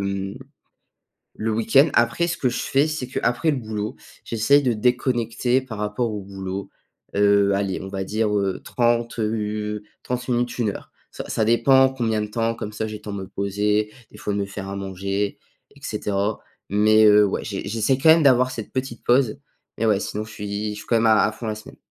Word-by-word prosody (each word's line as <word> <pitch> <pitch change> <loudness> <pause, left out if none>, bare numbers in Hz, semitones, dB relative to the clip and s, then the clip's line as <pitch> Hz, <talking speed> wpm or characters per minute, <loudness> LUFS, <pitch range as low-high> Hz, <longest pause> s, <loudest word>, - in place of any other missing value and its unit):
mmh, 100 0 -3 1.1
le 110 +1 0
week-end. 115 +7 +4
Après 120 +9 +2
ce 170 - -1
que 130 - 0
je - - -3
fais, 140 +3 +2
c'est 155 -4 -3
qu'après 130 +4 0
le 140 - -1
boulot, 110 -3 -4 0.3
j'essaie 120 +6 +3
de 125 -4 +1
déconnecter 125 +1 +1
par 125 -4 -8
rapport 105 +3 -1
au 105 -1 -4
boulot, 95 0 -6 0.4
heu, 100 0 +4
allez, 100 -1 -1
on 95 - -7
va 95 0 -3
dire, 105 +1 0
heu, 100 -2 0
30 120 -1 0
heu 105 -1 -2 0.2
30 125 0 -4
minutes, 120 0 0
1 115 -4 +1
heure. - - -10 0.2
Ça - - -7
ça 110 - +1
dépend 130 +3 +5
combien 115 -5 -1
de - - -4
temps, 115 +2 -1
comme 105 -2 -6
ça 110 - -3
j'ai 105 - -6
le - - -21
temps 105 - -6
de 100 - -4
me 95 - -7
poser, 105 +2 0 0.2
des - - -14
fois 105 - -3
de 100 - -1
me 100 - -1
faire 100 -1 -7
à 100 - -5
manger 100 +1 -3 0.4
et - - -17
cetera. 100 +1 -2 0.3
Mais 110 +1 +5
heu, 105 0 +7
ouais 95 - -2
j'ai 100 -2 -5
j'essaie 115 +4 +1
quand 160 - +5
même 160 -1 +7
d'avoir 130 -2 +5
cette 115 -4 -7
petite 130 -3 -4
pause. 125 -2 +3 0.4
Mais 115 - +1
ouais, 105 -3 +3
sinon 105 +1 -4
je 110 - -12
suis 105 +1 -4
je - - -6
suis - - -11
quand 115 - +2
même 115 - +2
à 110 -1 +5
à 105 - +2
fond 115 - -9
la 110 - -1
semaine. 110 - -12
110 Hz, 215 wpm, -23 LUFS, 100-120 Hz, 1.1 s, heu